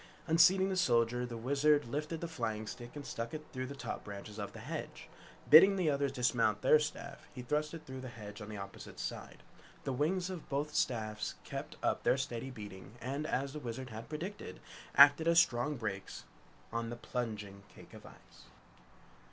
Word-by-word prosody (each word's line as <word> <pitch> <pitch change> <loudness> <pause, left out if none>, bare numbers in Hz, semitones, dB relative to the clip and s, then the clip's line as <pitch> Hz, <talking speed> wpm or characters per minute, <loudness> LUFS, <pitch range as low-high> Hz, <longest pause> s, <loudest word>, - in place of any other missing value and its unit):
Unseating 180 +4 +5
the 190 - 0
Soldier, 120 -7 +2
the 120 -1 -6
Wizard 145 +4 +3
lifted 150 +6 -3
the 170 - -2
flying 110 -9 -3
stick 120 +3 -8
and 145 -1 -7
stuck 115 +4 -4
it 155 0 -7
through 130 -1 -3
the 140 - -7
top - - -5
branches 105 +1 -8
of 100 - -4
the - - -10
hedge. - - -6 0.4
Bidding 190 +6 +9
the 175 -5 +2
others 140 -1 +1
dismount 120 -5 +2
from 130 - -1
their 155 - +9
staff, 150 -2 -5
he 125 - -6
thrust 150 +4 -1
it 160 -1 -10
through 130 -1 -7
the 130 - -6
hedge 105 -2 -9
on 105 - -7
the 105 - -6
opposite 100 0 -9
side. - - -6 0.4
The 135 - -2
wings 175 +7 0
of 180 -4 -7
both 145 +2 -1
staffs 110 -3 -1
kept - - -6
up - - +1
their - - +3
steady 130 -1 -3
beating 105 -4 -9
and, 140 +5 -3
as 135 0 -1
the 150 - -5
Wizard 125 -1 -6
had 110 +4 -8
predicted, 160 - -6 0.4
acted 145 +3 +8
as 170 0 +7
strong 145 -2 +2
brakes 100 -4 -5 0.5
on 115 0 -1
the 120 - -4
plunging 105 -5 -4
cake - - -15
of - - -11
ice. - - -17
130 Hz, 195 wpm, -34 LUFS, 115-150 Hz, 0.5 s, Bidding